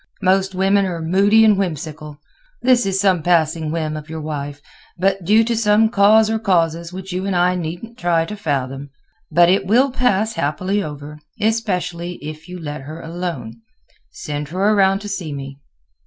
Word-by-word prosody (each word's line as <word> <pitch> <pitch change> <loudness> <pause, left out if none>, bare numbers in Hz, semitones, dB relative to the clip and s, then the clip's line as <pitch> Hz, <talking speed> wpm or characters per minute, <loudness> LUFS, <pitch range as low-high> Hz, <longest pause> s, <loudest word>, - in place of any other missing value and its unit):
Most 190 0 +2
women 195 +1 +2
are 175 -2 -4
moody 200 +7 +4
and 215 -1 +5
whimsical. 155 -5 -4 0.5
This 245 -5 +4
is 195 0 0
some 190 -4 +2
passing 160 -1 +1
whim 155 -2 -2
of 155 0 -8
your 160 0 -5
wife, 145 -2 -5 0.6
due 215 +6 +4
to 230 +1 -1
some 220 0 +3
cause 215 0 +5
or 220 0 -1
causes 170 -4 0
which 190 0 -7
you 185 +2 -2
and 195 - -1
I 180 +1 +3
needn't 180 +7 -6
try 170 -2 +1
to 210 - -6
fathom. 140 -6 -3 0.4
But 175 0 +5
it 190 +1 +2
will 255 +6 +3
pass 225 -4 +1
happily 185 +5 -1
over, 150 -2 -8 0.2
especially 180 -6 -1
if 155 -1 -9
you 180 0 -7
let 150 -3 -6
her 155 +4 -9
alone. 165 -10 -6 0.5
Send 145 -1 -5
her 190 +7 +1
around 195 -1 +3
to 205 - -7
see 190 -6 -4
me." 135 0 -8
180 Hz, 170 wpm, -19 LUFS, 155-200 Hz, 0.6 s, and